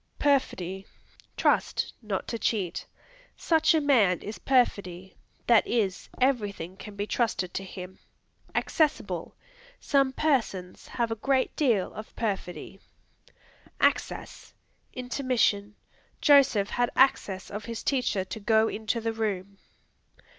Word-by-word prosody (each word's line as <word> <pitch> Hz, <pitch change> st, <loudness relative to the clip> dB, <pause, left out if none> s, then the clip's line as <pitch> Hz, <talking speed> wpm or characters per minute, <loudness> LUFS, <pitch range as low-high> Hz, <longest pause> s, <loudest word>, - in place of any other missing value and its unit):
Perfidy 195 Hz, -10 st, 0 dB, 0.5 s
Trust; -, -, +1 dB
not 210 Hz, -4 st, -3 dB
to 230 Hz, -, -3 dB
cheat; 195 Hz, -7 st, -1 dB, 0.5 s
"Such 320 Hz, -1 st, +3 dB
a -, -, +4 dB
man 235 Hz, -, +3 dB
is 210 Hz, -, -6 dB
perfidy; 190 Hz, -8 st, 0 dB, 0.3 s
that 235 Hz, -3 st, +5 dB
is, 200 Hz, -6 st, -1 dB
everything 205 Hz, -9 st, 0 dB
can 205 Hz, +1 st, -10 dB
be 205 Hz, 0 st, -2 dB
trusted 210 Hz, -6 st, -1 dB
to 195 Hz, -, -3 dB
him." 190 Hz, -1 st, -9 dB, 0.6 s
Accessible; 310 Hz, -3 st, 0 dB, 0.4 s
"Some 275 Hz, -2 st, +2 dB
persons 230 Hz, -11 st, -1 dB
have 235 Hz, -2 st, -2 dB
a -, -, 0 dB
great 260 Hz, +4 st, 0 dB
deal 235 Hz, -11 st, +1 dB
of 215 Hz, +2 st, -9 dB
perfidy." 195 Hz, -4 st, -4 dB, 1.0 s
Access -, -, -1 dB, 0.4 s
Intermission; 245 Hz, -5 st, 0 dB, 0.4 s
"Joseph 270 Hz, -8 st, +5 dB
had 245 Hz, 0 st, +1 dB
access 205 Hz, -7 st, +2 dB
of 210 Hz, +1 st, -6 dB
his 230 Hz, -1 st, -6 dB
teacher 245 Hz, -8 st, 0 dB
to 220 Hz, -, -6 dB
go 220 Hz, +1 st, +3 dB
into 220 Hz, +2 st, -2 dB
the 225 Hz, 0 st, -1 dB
room." 200 Hz, -3 st, -3 dB
220 Hz, 120 wpm, -27 LUFS, 195-255 Hz, 1.0 s, that